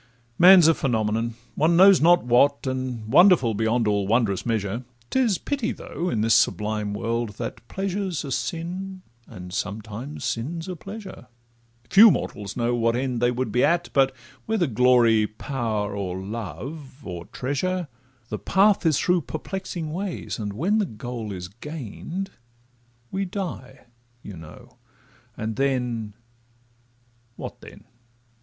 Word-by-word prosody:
Man 185 0 +9
's - - +6
a 165 - +6
phenomenon, 115 -4 -1 0.2
one 165 +3 +2
knows 190 0 +7
not 175 0 +5
what, 140 +4 +3
And 130 -3 -3
wonderful 175 - +6
beyond 110 +2 +1
all 100 -2 +1
wondrous 110 -2 +1
measure; 110 +1 -1 0.3
'Tis 240 -8 +2
pity 265 -5 -2
though, 175 +2 -4
in 110 - 0
this 115 +1 +3
sublime 105 -2 +1
world, 115 0 -2
that 110 - -5
Pleasure 195 0 -2
's 170 - -3
a 135 - -6
sin, 175 +9 -4 0.2
and 90 -4 -10
sometimes 110 +9 -5
sin 140 +9 -2
's 165 - -7
a 185 - -4
pleasure; 195 - -9 0.6
Few 220 +3 +9
mortals 105 - -3
know 120 0 +1
what 115 -1 +1
end 125 -1 -2
they 120 - +4
would 125 -2 -2
be 125 +4 +2
at, 170 +3 +2
But 135 -1 +4 0.4
whether 220 -5 +1
glory, 120 -3 +4
power, 110 -3 -3
or 95 -2 -3
love, 125 - -7
or 85 -2 -6
treasure, 175 +7 -2 0.4
The - - -4
path 195 -2 +3
is 155 -4 +3
through 180 -1 +2
perplexing 165 0 -5
ways, 185 -7 -4
and 105 -2 -3
when 185 - +1
The 205 - 0
goal 115 -2 -6
is 90 -2 -6
gain'd, 150 - -6 0.8
we 195 +1 -1
die, 180 - -6 0.4
you 100 - -8
know—and 105 +6 -11
then— 125 -6 -1 1.2
What - - -8
then? - - -13
125 Hz, 145 wpm, -24 LUFS, 110-175 Hz, 1.2 s, Man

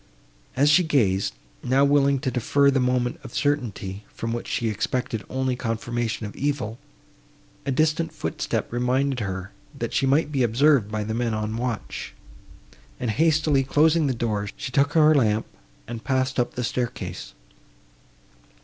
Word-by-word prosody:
As 140 +3 +3
she 180 +4 +5
gazed, 105 - +1 0.3
now 135 +3 +3
willing 140 -1 +4
to 130 -3 -1
defer 140 +3 +3
the 135 - +2
moment 125 -1 0
of - - -10
certainty, 115 -9 -1
from 115 0 -4
which 120 - -4
she 115 - -1
expected 110 +1 -2
only 130 -1 -1
confirmation 115 -1 -2
of 105 - -8
evil, 130 -6 -2 0.9
a - - +1
distant 155 +3 +1
footstep 115 - -3
reminded 130 +2 +1
her, 95 -2 -4 0.3
that - - -4
she 135 - +2
might 150 +3 +2
be 135 -3 0
observed 120 -1 +3
by 110 -1 -1
the 110 +1 -3
men 115 -1 -1
on 110 0 -2
watch, 120 -2 -4 0.8
and, 120 -3 -1
hastily 155 +1 +3
closing 150 +3 +3
the 130 - 0
door, 105 -3 -1
she 135 -2 -5
took 140 +3 +2
her 155 -1 +6
lamp, 110 -6 +2 0.4
and 115 -1 -6
passed 130 +2 0
up 120 - 0
the 125 - -2
staircase. 120 - -4
125 Hz, 155 wpm, -24 LUFS, 115-140 Hz, 0.9 s, her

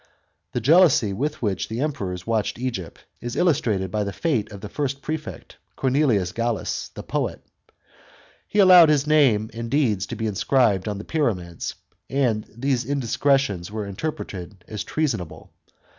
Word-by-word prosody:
The 125 - -1
jealousy 145 - +5
with 145 +6 -3
which 100 -4 -1
the 110 +2 -4
Emperors 95 -12 -3
watched 110 -2 -1
Egypt, 120 -9 -5 0.2
is 120 +1 -5
illus 175 -6 +3
trated 95 -5 -1
by 105 -1 0
the 100 - -3
fate 115 -6 -1
of 100 -2 -9
the 105 - -6
first 140 +3 -3
prefect, 155 -1 -6 0.2
Cornelius 130 -9 +2
Gallus, 115 -1 -2
the - - -7
poet. - - -3 1.0
He - - -4
allowed 180 -5 +8
his 150 -2 +3
name 130 -8 +3
and 115 +1 -5
deeds 115 -9 +1
to - - -5
be 110 - -3
inscribed 105 -1 +2
on 105 -1 -2
the 100 - -6
pyramids, 95 - -2 0.3
and 120 -6 0
these 130 +2 -1
indiscretions 135 -6 0
were 105 -1 -3
interpreted 95 - -6
as 105 -2 -4
treasonable. 115 - -3
115 Hz, 155 wpm, -23 LUFS, 100-140 Hz, 1.0 s, allowed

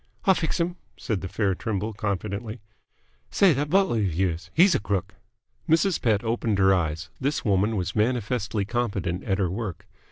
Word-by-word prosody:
"I'll 190 - +6
fix'm," 170 +1 -1 0.2
said 105 -4 -2
the 95 - -4
fair 100 +1 0
Trimble 105 +2 -3
confidently. 105 +2 -3 0.7
"Say, 195 -5 +4
that 145 +2 -1
butler 190 - +3
'f 95 -6 -1
yours. 85 -2 -1
He's 180 +3 +5
a - - +2
crook!" 100 -1 -2 0.6
Mrs. 165 +3 +3
Pett 110 -3 +2
opened 115 -2 0
her 95 0 +5
eyes. 80 -2 -2
This 140 +2 -1
woman 105 +2 +2
was 90 -3 -2
manifestly 110 -2 0
competent 100 -6 -2
at 95 -3 0
her 95 -4 0
work. 100 -4 -5
105 Hz, 165 wpm, -25 LUFS, 95-120 Hz, 0.7 s, I'll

